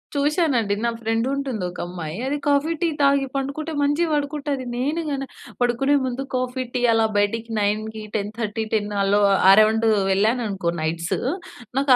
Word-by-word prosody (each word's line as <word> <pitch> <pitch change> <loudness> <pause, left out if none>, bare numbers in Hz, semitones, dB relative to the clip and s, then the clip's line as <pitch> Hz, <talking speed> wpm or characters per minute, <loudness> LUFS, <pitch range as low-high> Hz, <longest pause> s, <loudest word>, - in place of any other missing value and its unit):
చూసానండి 280 - +1
నా - - +3
ఫ్రెండ్ 225 +2 0
ఉంటుంది. 270 -7 -2
ఒక 180 - -8
అమ్మాయి 170 -2 -6
అది 280 +2 -1
కాఫీ, 290 +3 +2
టీ 345 - +3
తాగి 280 -1 +3
పండుకుంటే 280 +4 -3
మంచిగా 290 +4 +1
పడుకుంటది. 285 -2 -2
నేను 290 +7 -1
గన 275 -2 -2 0.4
పడుకునే 245 +4 +2
ముందు 260 +1 -2
కాఫీ, 255 0 -1
టీ 250 - -1
అలా 225 0 +3
బయటికి 220 +3 0
9, 215 +1 -1
10:30, 215 +1 -2
10 210 -1 0
అలో 200 +1 +3 0.3
అరౌండు 215 +2 +5 0.2
వెళ్ళాననుకో 205 -2 +1
నైట్‌సు 165 +2 -1 0.6
నాకు 275 0 +2
240 Hz, 145 wpm, -23 LUFS, 210-280 Hz, 0.6 s, అరౌండు